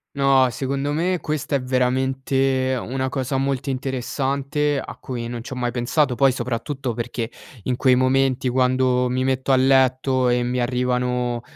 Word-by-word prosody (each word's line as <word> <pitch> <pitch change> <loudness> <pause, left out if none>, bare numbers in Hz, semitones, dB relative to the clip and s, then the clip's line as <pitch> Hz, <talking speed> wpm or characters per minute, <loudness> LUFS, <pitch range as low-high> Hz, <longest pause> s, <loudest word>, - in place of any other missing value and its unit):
No, 135 -2 +4
secondo 135 +4 -2
me 175 +4 0
questa 150 -2 -2
è - - -5
veramente 130 +1 0
una 130 +1 -2
cosa 130 0 -2
molto 135 0 -1
interessante, 135 +2 -1
a - - -8
cui 120 -2 -5
non 120 0 -5
c'ho 125 - -7
mai 125 -1 -2
pensato, 125 +3 0
poi 135 +1 +4
soprattutto 125 +1 -3
perché, 120 -1 -4 0.3
in 125 - -1
quei 130 +1 +3
momenti 130 0 +2
quando, 125 0 +2
mi 130 +1 -1
metto 130 +1 0
a - - +6
letto 130 -1 +3
e 120 0 +2
mi 125 +1 -1
arrivano, 125 -1 0
130 Hz, 155 wpm, -22 LUFS, 125-135 Hz, 0.3 s, a